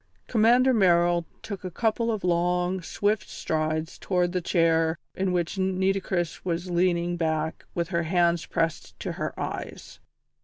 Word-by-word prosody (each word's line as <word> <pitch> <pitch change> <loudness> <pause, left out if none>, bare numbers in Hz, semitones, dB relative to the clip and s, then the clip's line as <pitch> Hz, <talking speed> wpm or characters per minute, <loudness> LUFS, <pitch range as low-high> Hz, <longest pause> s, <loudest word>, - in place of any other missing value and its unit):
Commander 245 +3 +4
Merrill 175 -4 +3 0.2
took 200 -3 -6
a 185 - -3
couple 230 +4 0
of 215 -3 -3
long, 180 +1 +1
swift 205 +5 -1
strides 155 0 -2
towards 180 -2 0
the 180 - 0
chair 165 -1 +2 0.2
in 190 -1 -1
which 175 +2 -1
Nitocris 190 -2 0
was 175 0 -2
leaning 175 0 +1
back 160 -1 -1
with 170 -1 -1
her 170 -2 0
hands 170 0 +1
pressed 165 -2 -2
to - - -3
her - - -4
eyes. - - -6
175 Hz, 145 wpm, -26 LUFS, 170-190 Hz, 0.2 s, Commander